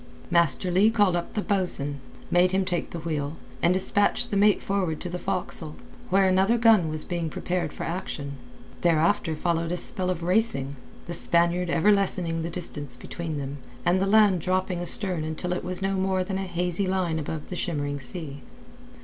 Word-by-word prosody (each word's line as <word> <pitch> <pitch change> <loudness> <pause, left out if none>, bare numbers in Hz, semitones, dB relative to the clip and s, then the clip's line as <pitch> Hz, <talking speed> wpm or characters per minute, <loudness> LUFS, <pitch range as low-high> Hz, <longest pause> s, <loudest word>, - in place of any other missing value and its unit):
Master 170 +1 +3
Leigh 195 +5 +5
called 205 -5 +3
up 175 - -4
the 210 - -1
bo'sun, 175 -8 -1 0.3
bade 180 +1 +4
him 190 0 +2
take 175 -2 -2
the - - -6
wheel, 155 -1 -3 0.2
and 170 - +4
dispatched 205 +5 +1
the - - 0
mate 205 +1 +4
forward 185 -6 -1
to 180 - -5
the 180 +1 -4
forecastle, 180 -5 -3 0.3
where 195 +1 +4
another 190 +5 +3
gun 225 -8 +5
was 155 0 +3
being 170 -2 -2
prepared 175 -1 -2
for - - -7
action. 165 -5 -4 0.5
Thereafter 165 -1 +2
followed 165 +1 -1
a 180 - -1
spell 185 +1 -3
of 175 -2 -2
racing, 175 -8 +2 0.3
the 170 - -5
Spaniard 170 +1 +1
ever 170 +5 +4
lessening 180 -5 +1
the 165 - -3
distance 145 -7 -2
between 160 +3 -5
them, 140 0 -5 0.3
and 180 +2 +3
the 195 - +1
land 205 -4 +5
dropping 185 0 -1
astern 175 -1 -1
until 160 +3 -3
it 180 - -3
was 185 +1 -4
no 195 0 0
more 190 -1 0
than 190 +1 -3
a 195 - -3
hazy 180 +2 -1
line 180 -4 0
above 155 0 -5
the 180 - -4
shimmering 145 -5 -2
sea. 140 +1 -6
180 Hz, 185 wpm, -26 LUFS, 160-190 Hz, 0.5 s, Leigh